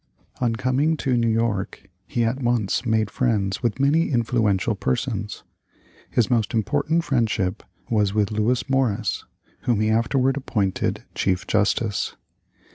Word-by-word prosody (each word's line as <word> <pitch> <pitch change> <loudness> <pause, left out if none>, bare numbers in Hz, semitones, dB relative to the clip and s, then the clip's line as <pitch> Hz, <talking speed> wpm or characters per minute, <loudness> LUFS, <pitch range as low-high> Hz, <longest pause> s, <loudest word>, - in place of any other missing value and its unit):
On 120 -2 +1
coming 135 +7 +1
to 130 -3 0
New 115 -1 +2
York 110 -3 -1 0.2
he 120 - 0
at 120 +4 -1
once 120 -1 0
made 110 -2 +1
friends 105 -6 0
with 120 0 -1
many 150 +5 +3
influential 115 -6 +1
persons. 65 - -2 0.7
His 120 - +2
most 115 -1 0
important 145 +9 +1
friendship 110 - 0 0.3
was 105 -3 +2
with 105 -1 +1
Lewis 110 +5 0
Morris, 120 -7 0 0.4
whom 120 -4 +2
he 110 0 +2
afterward 130 +4 +2
appointed 105 -8 -1
chief 95 -1 0
justice. 105 0 0
115 Hz, 130 wpm, -23 LUFS, 105-130 Hz, 0.7 s, many